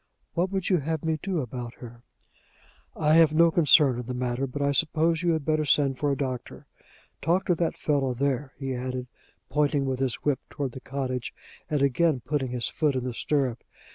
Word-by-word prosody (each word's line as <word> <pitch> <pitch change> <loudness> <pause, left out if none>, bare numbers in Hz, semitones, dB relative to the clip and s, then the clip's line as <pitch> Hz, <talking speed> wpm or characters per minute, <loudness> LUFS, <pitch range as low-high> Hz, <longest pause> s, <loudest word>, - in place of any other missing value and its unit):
"What 180 +3 0
would 190 -1 -2
you 180 - +5
have 160 +1 -3
me 160 -1 0
do 185 -5 -1
about 120 -1 -6
her?" 120 -1 -11 0.9
"I 150 0 +2
have 160 -1 +5
no 170 +1 +6
concern 150 -6 +5
in 125 - -6
the 125 - -3
matter, 125 +2 -1
but 145 +3 -3
I 140 - +2
suppose 160 +2 +1
you 175 -1 +2
had 160 -3 -2
better 155 -1 +1
send 140 -2 +2
for 145 -1 +1
a 140 - -1
doctor. 130 -3 -5 0.6
Talk 175 +5 +1
to 180 - +3
that 170 0 -1
fellow 135 -4 0
there," 135 +1 -1
he 135 -2 -3
added, 125 0 -4 0.5
pointing 145 -1 +1
with 130 -1 -2
his 130 -3 0
whip 145 -3 +2
toward 140 -3 -3
the 130 - -8
cottage, 130 -2 -4 0.3
and 150 -2 +1
again 140 +2 +2
putting 135 +1 -2
his 120 -2 -1
foot 150 -4 0
in 130 - -1
the 125 -1 -3
stirrup. 130 -2 -1
140 Hz, 200 wpm, -26 LUFS, 130-155 Hz, 0.9 s, no